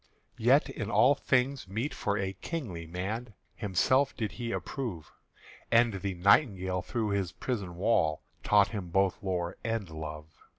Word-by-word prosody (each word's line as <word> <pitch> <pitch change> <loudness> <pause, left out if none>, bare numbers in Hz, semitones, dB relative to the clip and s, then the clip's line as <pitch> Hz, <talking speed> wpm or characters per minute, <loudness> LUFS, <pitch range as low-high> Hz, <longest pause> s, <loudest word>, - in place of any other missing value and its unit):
Yet - - +4
in - - -5
all 140 - +5
things 130 -3 0
meet 115 +10 -2
for 105 0 -1
a 95 -1 -2
kingly 95 - -5
man 105 +6 -4 0.2
Himself 130 +7 +1
did 110 -4 -2
he 120 -1 -4
approve; 110 - -4 0.6
And 115 -4 +4
the 100 -2 -2
nightingale 95 - +3
through 110 +4 -2
his 100 -4 -1
prison 100 -8 -4
wall 90 -5 +1 0.2
Taught 105 -1 +4
him 100 -5 -5
both 95 +1 +1
lore 90 -3 -2
and 115 -3 -2
love. 75 -1 -6
100 Hz, 145 wpm, -30 LUFS, 90-115 Hz, 0.6 s, all